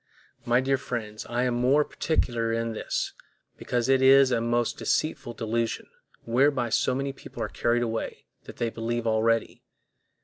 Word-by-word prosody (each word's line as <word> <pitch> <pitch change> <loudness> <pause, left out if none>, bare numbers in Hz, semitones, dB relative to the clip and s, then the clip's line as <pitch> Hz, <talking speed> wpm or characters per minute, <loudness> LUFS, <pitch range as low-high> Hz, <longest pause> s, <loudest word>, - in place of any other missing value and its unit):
My 120 +1 +3
dear 135 0 +1
friends, 110 -5 -5
I 120 +1 -1
am 125 -1 +1
more 130 +5 +3
particular 120 -7 -1
in 115 0 -1
this, - - -3 0.4
because 120 -1 -2
it 135 0 +4
is 135 0 +6
a 120 -2 +1
most 120 0 0
deceitful 125 -6 -1
delusion, 115 0 -2 0.4
whereby 130 +1 +2
so 125 - +1
many 135 +1 -2
people - - -8
are - - -1
carried 120 0 +1
away, 115 -1 -4 0.2
that - - -11
they 115 -1 -1
believe 115 +1 -3
already. 115 0 +1
120 Hz, 160 wpm, -26 LUFS, 115-130 Hz, 0.4 s, is